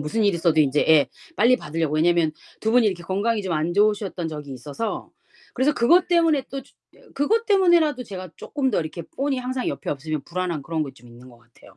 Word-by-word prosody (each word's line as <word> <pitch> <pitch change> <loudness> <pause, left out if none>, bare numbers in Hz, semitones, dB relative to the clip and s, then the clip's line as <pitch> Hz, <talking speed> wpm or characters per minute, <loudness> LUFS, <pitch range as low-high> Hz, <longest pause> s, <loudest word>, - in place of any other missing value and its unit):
무슨 150 +10 -1
일이 200 -4 +2
있어도 165 -2 +2
인제 145 0 +2
예 155 -3 +5 0.3
빨리 245 +4 +5
받으려고. 155 -3 -2
왜냐면 165 0 +3 0.3
두 220 - 0
분이 245 -2 +5
이렇게 185 -4 -1
건강이 205 +5 -1
좀 185 - -3
안 160 +2 -1
좋으셨던 200 -4 +1
적이 150 -3 -7
있어서. 145 - -5 0.4
그래서 270 +4 +2
그것 345 +10 +4
때문에 330 -6 +3
또 275 0 -5
주 - - -24 0.2
예 - - -21
그것 445 +12 +1
때문에라도 345 - +3
제가 185 -6 -8
쪼끔 270 -3 -2
더 205 - +1
이렇게 160 +2 -6
폰이 275 - -3
항상 255 0 -3
옆에 140 - -4
없으면 150 +1 -3
불안한 175 -3 -3
그런 160 +2 -2
거 140 - -5
좀 120 -2 -18
있는 120 +2 -15
거 120 - -16
같아요. 120 0 -21
185 Hz, 445 characters per minute, -23 LUFS, 155-255 Hz, 0.4 s, 예